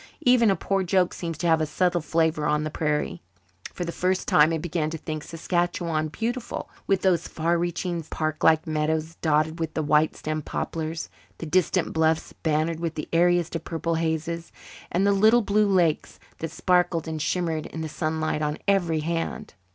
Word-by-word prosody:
Even 245 -3 +5
a 195 - +3
poor 195 0 0
joke 185 -1 +2
seems 165 -3 -5
to 175 - -4
have 160 -1 +4
a 155 - 0
subtle 175 +2 +1
flavour 160 -1 +1
on 150 0 +1
the 155 - -3
prairie. 150 - -1 0.5
For 175 - -4
the 170 - -3
first 185 +2 -1
time 150 +2 +5
I 165 - 0
began 160 -1 -2
to 165 - -4
think 155 -1 -5
Saskatchewan 170 -1 -1
beautiful, 235 - -4 0.2
with 195 -1 +1
those 180 -3 +2
far 165 +2 0
reaching 175 0 -2
parklike 155 0 +1
meadows 155 +1 -1
dotted 160 +1 +1
with 160 -1 -3
the 155 - 0
white 150 +1 +3
stemmed 155 -1 -4
poplars, 160 0 -3 0.3
the - - -6
distant 180 +2 +1
bluffs 160 0 +1
bannered 160 +1 -1
with 165 -1 -3
the 150 - -5
airiest 175 0 +3
of 165 - -3
purple 165 0 -2
hazes, 165 +1 -2 0.4
and 185 +3 +2
the 200 - +4
little 220 +4 +5
blue 210 +1 +2
lakes 175 -5 +1 0.2
that 165 - -3
sparkled 175 -2 +1
and 160 -1 -3
shimmered 165 -1 -1
in 160 - -6
the 160 - -3
sunlight 155 0 -2
on 150 0 -1
every 175 -6 +2
hand. 165 +1 -3
165 Hz, 180 wpm, -25 LUFS, 155-175 Hz, 0.5 s, Even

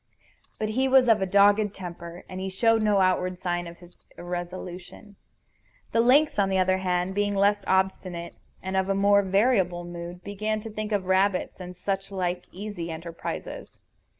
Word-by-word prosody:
But 215 - -2
he 260 +5 +1
was 260 -1 +5
of 210 -5 +3
dogged 205 +1 +4
temper, 170 -1 -8
and 185 - -7
he 190 0 -3
showed 225 +4 +2
no 210 -2 +3
outward 185 0 +1
sign 175 -1 -2
of 170 0 -10
his 175 0 -17 0.2
irresolution. 180 +3 -7 0.8
The 230 - +1
lynx, 275 +3 +4
on 195 -1 +3
the 190 - +1
other 185 0 +2
hand, 180 0 -1
being 205 0 0
less 200 +1 +2
obstinate 185 -2 -1 0.3
and 190 0 -3
of 190 0 +1
more 200 0 +5
variable 190 -3 +2
mood, 175 +1 -8
began 215 +2 -2
to 225 - -8
think 215 0 -5
of 200 -3 0
rabbits 190 +1 +1
and 180 -1 -8
such 195 +1 -3
like 180 -2 -2
easy 195 -3 -6
enterprises. 165 +1 -7
190 Hz, 165 wpm, -26 LUFS, 180-205 Hz, 0.8 s, was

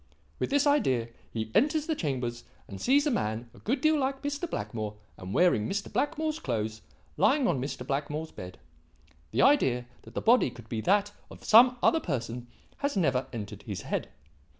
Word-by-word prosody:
With - - -1
this 285 +1 +3
idea 130 - +2 0.2
he 110 -1 -4
enters 305 +1 +3
the 320 - 0
chambers 125 - -3 0.2
and 100 -2 -9
sees 285 +3 +4
a 295 - +2
man 115 - -2
a - - -16
good 260 +4 -1
deal 310 0 +3
like 270 0 -1
Mr. 290 +4 -3
Blackmore 110 - -4 0.2
and 90 +1 -8
wearing 115 - +3
Mr. 200 0 -3
Blackmore's 310 +2 -1
clothes, 110 - -3 0.4
lying 275 -2 +3
on 130 - +1
Mr. 130 -2 -4
Blackmore's 150 +3 -3
bed. 90 0 -9 0.7
The - - +2
idea 135 - +4 0.2
that - - -15
the - - 0
body 235 - +4
could 120 -2 -13
be 110 -2 -2
that 205 - +2 0.2
of - - -13
some 245 +3 +7
other 325 - +5
person 120 - -4 0.3
has 280 -6 -1
never 135 -7 +1
entered 105 -4 -6
his - - -6
mind. - - -2
155 Hz, 180 wpm, -29 LUFS, -, 0.7 s, some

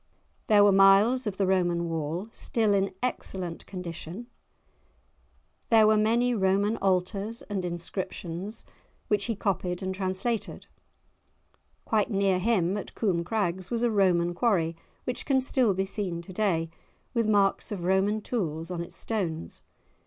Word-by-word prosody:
There 205 -1 +6
were 205 - +6
miles 200 +6 +5
of 195 -2 -3
the 195 - +2
Roman 175 -2 +1
wall, 165 +4 -3
still 220 -3 0
in 195 0 +1
excellent 185 -8 -4
condition; 180 +3 -7 1.4
there 225 -2 +6
were 215 0 +5
many 230 +3 +2
Roman 200 +1 +2
altars 195 +4 -1
and 200 -3 -4
inscriptions, 175 +3 -5 0.4
which 205 -1 +1
he 230 - -1
copied 185 -3 -2
and 190 0 -2
translated; 190 +4 -2 1.2
quite 215 -2 +1
near 195 -3 +2
him, 195 -2 +1
at 205 - -7
Coome 180 -6 0
Crags, 185 -2 -2
was 235 0 -1
a 240 - +3
Roman 180 -4 +2
quarry, 175 -5 +1 0.3
which 250 - -3
can 270 -2 +2
still 255 -5 +2
be 190 +1 0
seen 190 -4 -4
to 185 - -10
day, 170 -5 0 0.4
with 230 -3 +1
marks 200 -1 +2
of 190 -4 -4
Roman 190 +4 +2
tools 165 -8 -3
on 175 -1 -3
its 170 - -9
stones. 170 - -3
195 Hz, 145 wpm, -27 LUFS, 180-215 Hz, 1.4 s, There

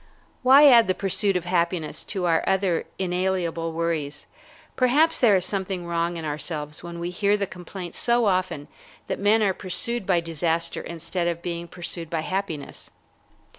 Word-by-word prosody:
Why 270 +3 +7
add 235 -4 +7
the 185 - +1
pursuit 195 0 +2
of 175 - -5
happiness 170 -2 -1
to 190 -4 -3
our 165 -2 +2
other 190 -3 +1
inalienable 180 -3 -1
worries? 160 -3 -3 0.5
Perhaps 295 +6 +3
there 225 -5 +5
is 185 -1 +1
something 190 -2 -2
wrong 170 0 -1
in 165 - -5
ourselves 150 0 -4
when 170 0 -8
we 170 +1 -4
hear 200 +3 +1
the 200 - -1
complaint 180 -1 -9
so 240 -1 +2
often 185 -7 0 0.4
that - - -4
men 210 +2 +3
are 195 -2 +2
pursued 195 +4 -1
by 180 -3 +3
disaster 165 0 -1
instead 170 +1 -4
of 170 0 -3
being 170 -1 -4
pursued 170 -1 -4
by 165 -1 -1
happiness. 175 -4 -5
180 Hz, 165 wpm, -24 LUFS, 170-195 Hz, 0.5 s, Why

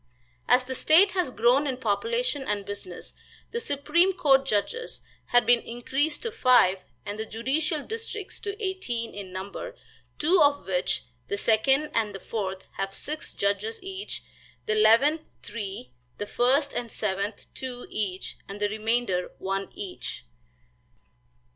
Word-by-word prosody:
As 250 +1 +5
the 260 +1 -4
state 340 +9 +6
has 360 -4 0
grown 250 +4 +3
in 260 -2 -1
population 370 - 0
and 205 -6 -2
business, 195 -3 -7 0.4
the 470 - -1
supreme 340 -1 +2
court 275 -7 +4
judges 365 - -1 0.3
have 245 -1 +4
been 240 +1 +5
increased 270 +6 -1
to 460 - -2
five 250 - +5 0.3
and 205 +1 -5
the 220 - -1
judicial 285 +7 -1
districts 440 -1 -5
to 410 +1 -5
eighteen 375 - -2
in 200 -2 -7
number, 190 +2 -6 0.4
two 335 +4 +4
of 285 -1 +4
which, 180 -1 0 0.2
the 200 - -1
second 270 +8 +3
and 215 -3 +1
the - - -5
fourth, 190 -2 -4
have 195 0 -2
six 305 +1 -4
judges 200 +2 0
each, 385 +1 -6 0.4
the 215 - +1
eleventh 230 +9 +5 0.2
three, 195 - -6 0.3
the 205 - -3
first 270 +6 +2
and 235 -2 -3
seventh 200 0 -2
two 250 -2 -5
each, 195 -3 -3
and 200 +1 -6
the 205 0 +1
remainder 215 -3 0
one 195 +1 -2
each. 195 -3 -5
245 Hz, 145 wpm, -27 LUFS, 205-300 Hz, 0.4 s, state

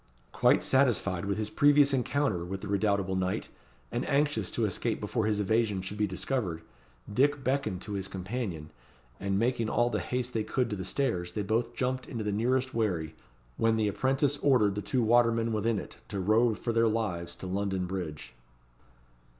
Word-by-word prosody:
Quite - - +3
satisfied 110 -9 +2
with 100 +1 -1
his 110 0 -3
previous 145 0 +5
encounter 135 -7 0
with 95 +2 -5
the 105 - -6
redoubtable 100 -1 +1
knight, 95 0 -1 0.4
and 120 - -1
anxious 140 -9 +1
to 115 - 0
escape 110 +3 -1
before 105 +1 -1
his 105 -1 +1
evasion 105 -2 +1
should 100 +3 -6
be 105 - +2
discovered, 95 -4 -2 0.5
Dick 140 +4 +2
beckoned 130 -8 -1
to 105 - -6
his 95 -1 -3
companion, 95 -5 -5 0.5
and, 95 0 -1
making 115 0 +1
all 120 +2 +2
the - - 0
haste 125 0 -3
they 110 - 0
could 125 +1 -1
to - - -1
the 95 - -5
stairs, 90 -7 -1
they 105 - -2
both 115 +3 -1
jumped 130 0 -1
into 115 -3 -4
the 105 - -1
nearest 125 +5 0
wherry, 90 -9 -1 0.4
when 115 0 +3
the 110 -1 +2
apprentice 135 +7 +1
ordered 125 -9 +3
the 105 - -3
two 125 +3 0
watermen 115 0 +3
within 110 +1 +1
it - - -7
to 100 - -4
row 110 +4 +3
for 115 +3 -3
their 115 0 +4
lives 90 -7 -2
to - - -9
London 95 0 -1
bridge. 85 -7 -5
110 Hz, 185 wpm, -29 LUFS, 95-125 Hz, 0.5 s, previous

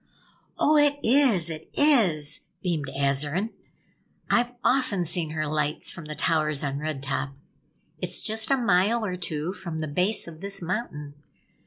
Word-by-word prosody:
"Oh, 305 +1 +4
it 290 -1 +4
is! 230 - +4
It 155 0 -8
is!" 200 - +3 0.2
beamed 165 -6 -1
Azarine. 140 +9 0 0.8
"I've 245 0 +3
often 250 -9 +2
seen 170 -1 -2
her 155 0 -2
lights, 150 0 -1
from 170 - -9
the 150 0 -6
towers 155 -2 +1
on 140 0 -2
Red 150 -3 -4
Top. 140 0 -2 0.6
It's - - -3
just 220 0 0
a 275 - +4
mile 215 0 +3
or 185 -3 -2
two 170 -1 -3
from 175 -5 -6
the 155 -1 -2
base 180 +9 +1
of 160 -1 -10
this 195 0 -3
mountain. 170 -6 -4
170 Hz, 155 wpm, -26 LUFS, 150-220 Hz, 0.8 s, Oh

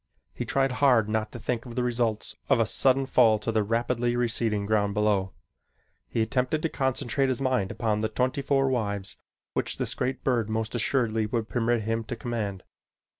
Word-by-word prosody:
He - - -4
tried 135 -1 +1
hard 125 -7 +5
not 110 0 -1
to - - -7
think 120 +1 -3
of 120 - -8
the 125 - 0
results 115 -3 -1
of - - +4
a 115 - +4
sudden 135 +4 +3
fall 115 -4 +4
to 105 +2 -3
the 110 -1 +2
rapidly 120 +2 0
receding 115 -3 0
ground 100 -1 +1
below. 105 -3 +1 0.8
He 115 - +1
attempted 130 +6 0
to 165 - +1
concentrate 130 0 0
his 130 - 0
mind 130 -8 +1
upon 110 -3 -1
the 110 0 0
twenty 130 +2 0
four 135 -1 +2
wives 100 -6 -1 0.4
which - - -1
this - - -2
great 130 - -2
bird 120 -5 +1
most 110 0 -2
assuredly 115 -2 +1
would 115 0 -2
permit 120 -1 +1
him 115 +1 -1
to 120 - -4
command. 105 -6 -4
115 Hz, 185 wpm, -27 LUFS, 110-125 Hz, 0.8 s, hard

